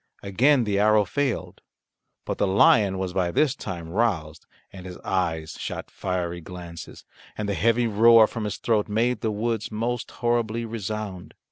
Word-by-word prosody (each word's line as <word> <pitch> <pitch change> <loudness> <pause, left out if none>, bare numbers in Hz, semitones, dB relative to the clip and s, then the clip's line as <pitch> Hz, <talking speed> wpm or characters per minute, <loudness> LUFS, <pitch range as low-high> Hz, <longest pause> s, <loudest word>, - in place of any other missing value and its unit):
Again 125 +7 +3
the 100 -2 0
arrow 105 0 +4
failed. 105 -6 -2 0.6
But - - -4
the 100 - +2
lion 100 0 +4
was 95 -1 -3
by 90 -2 0
this 140 - +2
time 90 - -7
roused, 85 -6 -1 0.3
and 95 -1 -9
his 90 - -8
eyes 85 -4 -2
shot - - -6
fiery 90 -2 -3
glances, 85 -1 -10 0.3
and 105 - -3
the 100 - -1
heavy 115 +4 +2
roar 115 +1 +6
from 110 0 -5
his 105 -2 -3
throat 110 -3 0
made 115 +2 0
the 110 - 0
woods 110 +1 -2
most 120 +3 -3
horribly 115 -1 -1
resound. 110 -4 -6
105 Hz, 160 wpm, -25 LUFS, 90-115 Hz, 0.6 s, roar